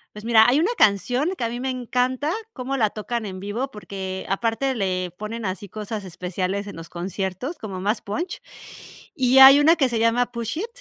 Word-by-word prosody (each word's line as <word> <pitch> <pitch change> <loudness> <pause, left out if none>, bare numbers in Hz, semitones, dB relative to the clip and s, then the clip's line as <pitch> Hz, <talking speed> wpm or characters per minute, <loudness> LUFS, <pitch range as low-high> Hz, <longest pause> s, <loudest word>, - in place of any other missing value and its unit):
Pues 210 - -9
mira, 225 -1 +6
hay 265 +5 +4
una 360 +7 +2
canción 245 - +3
que - - -7
a 230 - +1
mí 240 +1 -5
me 260 +1 -2
encanta 255 +3 -1 0.2
cómo 265 - -3
la 220 -5 +2
tocan 225 +2 -4
en 185 -1 -7
vivo 230 +8 -4
porque 190 -2 -6
aparte 230 +6 0
le 185 -3 -1
ponen 220 +2 -5
así 195 +1 -4
cosas 210 +1 -6
especiales 185 +2 -3
en 200 - -8
los 165 0 -9
conciertos, 190 - -4
como 195 -4 -6
más 210 +4 0
punch, 340 - -4 0.7
y 260 -3 +3
hay 270 +1 +10
una 310 +3 +6
que 275 -6 +2
se 235 -2 -2
llama 230 +2 +2
"Push 235 +4 -4
It", 410 - -2
225 Hz, 200 wpm, -23 LUFS, 195-255 Hz, 0.7 s, hay